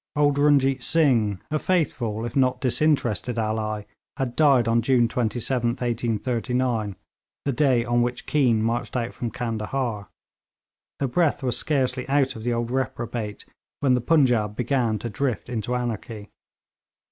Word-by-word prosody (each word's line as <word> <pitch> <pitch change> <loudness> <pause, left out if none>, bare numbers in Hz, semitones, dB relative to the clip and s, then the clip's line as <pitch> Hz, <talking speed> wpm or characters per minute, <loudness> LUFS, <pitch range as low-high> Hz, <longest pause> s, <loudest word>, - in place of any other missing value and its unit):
Old 145 -1 +2
Runjeet 140 -2 +3
Singh, 115 - +2
a 155 - +1
faithful 120 - -1
if 120 - -6
not 130 -2 +2
disinterested 125 -3 +1
ally, 110 -1 -1 0.3
had 125 -2 -2
died 135 -7 +4
on 115 +1 +3
June 120 0 +3
27th, 120 +1 -1
1839, 120 -1 -1 0.5
the 140 - +1
day 130 -3 +2
on 120 0 +2
which 120 +1 -2
Keane 120 -7 +2
marched 120 +2 -1
out 120 -1 -2
from 120 - -4
Candahar. 115 -2 -3 0.9
The 140 - -1
breath 150 +2 +1
was 125 -2 0
scarcely 130 -1 -1
out 135 -1 +2
of 110 - -8
the 120 - 0
old 120 0 -2
reprobate 120 -4 -3 0.4
when 135 -3 +3
the 125 - +2
Punjaub 120 -8 +2
began 120 -2 0
to 115 - -5
drift 125 +2 -2
into 120 0 -2
anarchy. 115 -3 -4
120 Hz, 145 wpm, -24 LUFS, 115-135 Hz, 0.9 s, died